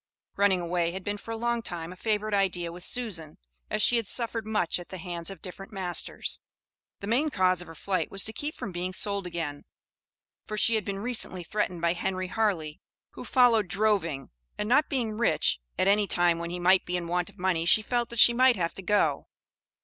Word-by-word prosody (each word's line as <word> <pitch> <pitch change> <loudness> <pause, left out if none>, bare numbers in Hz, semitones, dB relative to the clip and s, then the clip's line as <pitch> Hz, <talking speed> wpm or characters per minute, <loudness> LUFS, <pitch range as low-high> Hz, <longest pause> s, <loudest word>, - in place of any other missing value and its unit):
Running 200 -2 +3
away 170 0 -1
had 190 0 -6
been 205 +1 -3
for 225 - -13
a 225 - -3
long 235 +1 -1
time 175 -4 -5
a - - -14
favorite 215 +2 -1
idea 180 -4 0
with 175 +1 -9
Susan, 185 -11 0 0.3
as 210 - 0
she 240 - +5
had 230 -3 -2
suffered 230 -1 0
much 210 -6 0
at 175 - -11
the 190 - -7
hands 170 -1 -3
of 195 - -10
different 195 +3 -9
masters. 185 -4 0 0.6
The - - -5
main 250 +9 +1
cause 185 -7 +2
of 180 - -10
her 165 - -11
flight 190 +3 -2
was 195 0 +1
to 220 - 0
keep 295 +5 -4
from 200 - -6
being 180 +1 -4
sold 200 -1 +2
again; 160 -5 -5 0.8
for 215 - -6
she 230 - +4
had 220 -2 0
been 200 -1 -3
recently 205 -5 -2
threatened 180 -2 -2
by 170 0 +2
Henry 185 +1 -3
Harley, 180 -8 -1 0.3
who - - -9
"followed 235 -6 +4
droving," 195 -8 0 0.3
and 210 - -2
not 275 +6 +3
being 230 -5 -2
rich, 235 - +2 0.2
at 185 - +1
any 205 +1 +3
time 175 -2 +2
when 170 0 -4
he 175 - -4
might 185 +1 +4
be 180 0 -2
in 175 - -4
want 175 0 -1
of - - -20
money 180 -3 0
she 215 +5 +5
felt 240 +1 -1
that 235 - -7
she 235 - +8
might 255 +1 +5
have 170 -4 -2
to - - -9
go. 175 -7 +1
195 Hz, 220 wpm, -27 LUFS, 175-220 Hz, 0.8 s, she